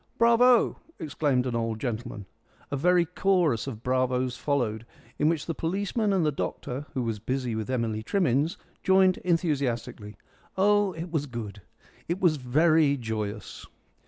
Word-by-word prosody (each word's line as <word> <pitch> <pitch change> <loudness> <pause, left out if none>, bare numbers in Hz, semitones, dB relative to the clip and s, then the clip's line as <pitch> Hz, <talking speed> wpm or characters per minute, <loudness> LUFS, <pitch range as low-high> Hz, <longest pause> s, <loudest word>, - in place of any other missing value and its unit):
"Bravo!" 235 +1 +4 0.2
exclaimed 145 -5 0
an 125 -2 -2
old 115 -1 -2
gentleman. 120 -4 -4 0.5
A - - 0
very 175 +4 +3
chorus 175 - +1
of 115 -4 -7
bravos 130 0 0
followed, 120 -6 -1 0.4
in 150 - +3
which 160 -3 -1
the 165 - -2
policeman 200 +6 -1
and 185 -4 +2
the 150 - +2
doctor, 140 0 -4
who 130 - 0
was 115 -2 -3
busy 125 +2 -2
with 110 +1 -4
Emily 115 -4 -1
Trimmins, 155 - +1 0.2
joined 190 -1 +4
enthusiastically. 135 - -1 0.4
Oh, 205 0 +3
it 165 +1 -7
was 150 -3 -1
good. 110 -5 -7 0.5
It 170 +3 -2
was 170 -5 +3
very 150 +3 +3
joyous. 110 -3 -5
140 Hz, 145 wpm, -27 LUFS, 120-175 Hz, 0.5 s, Bravo